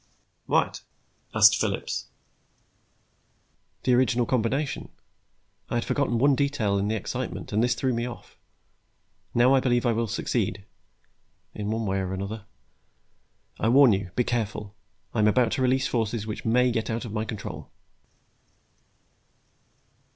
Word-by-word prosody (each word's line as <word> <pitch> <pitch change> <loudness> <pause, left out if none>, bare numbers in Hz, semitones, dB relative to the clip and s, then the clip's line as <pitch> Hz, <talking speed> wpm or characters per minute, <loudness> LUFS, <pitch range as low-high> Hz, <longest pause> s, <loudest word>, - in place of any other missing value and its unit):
"What?" - - +1 0.5
asked - - +7
Phillips. - - -2 1.8
"The 125 - +3
original 125 -1 +3
combination. 130 +4 -1 0.8
I - - -2
had 120 - 0
forgotten 135 -5 0
one 140 +4 +4
detail 130 -8 +1
in 100 - 0
the 110 - 0
excitement, 105 - -5
and 110 +3 +2
this 120 0 +2
threw 130 0 0
me 120 +1 -1
off. 120 - -10 1.0
Now 120 +3 +5
I 135 - +5
believe 120 -1 +1
I 120 - +3
will 115 0 0
succeed 105 -3 -2 0.9
in 105 0 -4
one 110 +1 -1
way 95 -1 0
or 95 0 -3
another. 100 +3 -5 1.1
I 110 - +2
warn 130 -2 +7
you, 95 -1 -2
be 125 - +2
careful. 105 -4 -3 0.4
I 115 - -1
am 105 - +4
about 115 +1 +3
to 135 - -1
release 130 +1 +2
forces 115 -4 -1
which 105 -1 -6
may 125 +2 +3
get 115 -1 -2
out 115 +1 -2
of 110 - -7
my 110 -1 -1
control." 110 -2 -7
115 Hz, 145 wpm, -26 LUFS, 105-125 Hz, 1.8 s, asked